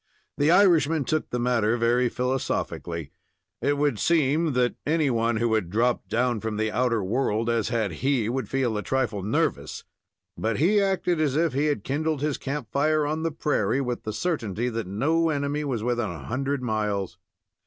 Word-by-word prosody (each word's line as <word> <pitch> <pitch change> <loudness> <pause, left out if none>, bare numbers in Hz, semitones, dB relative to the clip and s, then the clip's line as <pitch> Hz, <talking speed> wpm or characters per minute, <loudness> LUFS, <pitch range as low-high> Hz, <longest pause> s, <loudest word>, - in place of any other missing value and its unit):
The 145 +2 +3
Irishman 165 -5 +4
took 155 +3 -1
the 125 - -2
matter 120 -2 +1
very 120 +1 +2
philosophically. 115 - -3 0.5
It 145 0 +1
would 145 -6 +1
seem 155 +1 +2
that 125 -1 +2
any 155 -2 +1
one 115 0 +1
who 115 0 +1
had 110 -6 0
dropped 120 +5 0
down 120 0 +1
from 110 0 -3
the 110 0 0
outer 115 -1 +1
world 115 +2 0
as 115 -1 0
had 115 -5 0
he, 125 - 0
would 125 -2 -2
feel 130 -4 0
a 105 - -1
trifle 120 -5 -1
nervous; 100 +4 -1 0.5
but 110 -1 -1
he 200 +8 +3
acted 185 -4 +1
as 145 -3 +1
if 160 -2 +1
he 140 +3 +1
had 145 -9 -1
kindled 150 +2 -1
his 150 -2 -1
camp 140 -4 -4
fire 150 +2 +2
on 155 +2 -2
the 165 - 0
prairie, 150 -3 0
with 125 -3 -2
the 110 - -4
certainty 120 - -2
that 115 -4 -4
no 155 - +1
enemy 145 0 -1
was 125 -7 -2
within 120 -2 0
a 80 -5 -8
hundred 135 +2 -2
miles. 105 -6 -2
125 Hz, 185 wpm, -25 LUFS, 110-150 Hz, 0.5 s, Irishman